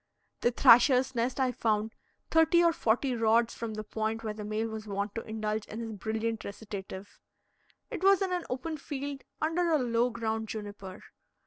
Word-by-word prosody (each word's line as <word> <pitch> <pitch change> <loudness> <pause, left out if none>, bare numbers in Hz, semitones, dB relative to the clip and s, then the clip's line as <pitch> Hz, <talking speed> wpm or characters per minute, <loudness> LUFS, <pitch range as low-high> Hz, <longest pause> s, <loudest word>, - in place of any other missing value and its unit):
The - - +3
thrasher's 250 +2 +6
nest 245 +2 -1
I 260 -1 +2
found 220 -2 0 0.4
thirty 325 +2 +5
or 335 -1 +4
forty 250 +1 +1
rods 230 0 +3
from 225 -2 -5
the 215 - -4
point 220 +1 -3
where 215 -1 -3
the 210 0 -7
male 215 +2 -2
was 220 -1 -7
wont 200 0 -3
to 225 - -3
indulge 215 -1 -3
in 220 - -7
his 230 -1 -4
brilliant 220 +1 -3
recitative. 200 -1 -8 0.7
It 400 -6 -5
was 390 0 +5
in 375 -1 -1
an 355 -1 -1
open 300 +5 -3
field 280 -1 -5 0.2
under 335 +2 +1
a 320 - +4
low 240 -2 +1
ground 220 -1 -3
juniper. 205 -3 -7
230 Hz, 180 wpm, -30 LUFS, 215-265 Hz, 0.7 s, thrasher's